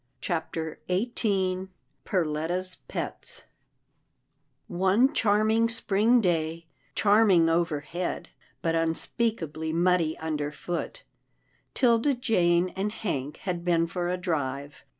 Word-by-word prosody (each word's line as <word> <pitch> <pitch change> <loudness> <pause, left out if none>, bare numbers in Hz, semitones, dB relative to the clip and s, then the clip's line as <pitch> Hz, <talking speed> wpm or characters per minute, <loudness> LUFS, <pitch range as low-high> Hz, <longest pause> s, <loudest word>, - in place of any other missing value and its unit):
CHAPTER 160 0 -3
XVIII 190 -2 0 0.4
PERLETTA^'S 175 +1 -1
PETS - - -1 1.2
One 190 - +3
charming 220 +1 +3
spring 230 +2 +3
day 165 -3 -1 0.2
— - - -38
charming 205 -5 +5
overhead, 165 +1 -2 0.3
but 165 - +1
unspeakably 165 -1 -1
muddy 170 -1 +2
underfoot, 160 - -4 0.7
'Tilda 245 +2 +3
Jane 180 -7 +2
and 195 +3 -3
Hank 150 -10 -3
had 175 -3 -2
been 170 -1 +2
for 175 +1 -3
a 180 - -1
drive. 145 -5 -3
180 Hz, 95 wpm, -27 LUFS, 165-205 Hz, 1.2 s, charming